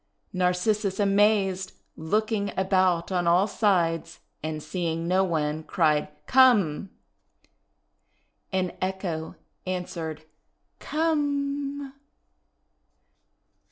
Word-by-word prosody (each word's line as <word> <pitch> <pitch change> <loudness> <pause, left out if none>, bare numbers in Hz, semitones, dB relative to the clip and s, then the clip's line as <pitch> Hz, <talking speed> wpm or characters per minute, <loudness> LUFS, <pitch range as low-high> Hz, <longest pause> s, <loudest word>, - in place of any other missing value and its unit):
* - - -45
Narcissus, 185 +2 0
amazed, 200 -2 +2 0.2
looking 210 +5 -1
about 185 -2 +2
on 175 -2 0
all 175 +3 +4
sides 170 -6 0 0.2
and 155 0 -4
seeing 165 0 -3
no 185 +2 +3
one, 155 -3 -1
cried, 155 -2 +1 0.2
:'Come!5i 210 - +4 1.6
And 185 -2 -1
Echo 185 -4 -3 0.3
answered, 165 -4 -4 0.6
"Come!' 285 -3 -1
185 Hz, 80 wpm, -26 LUFS, 165-210 Hz, 1.6 s, all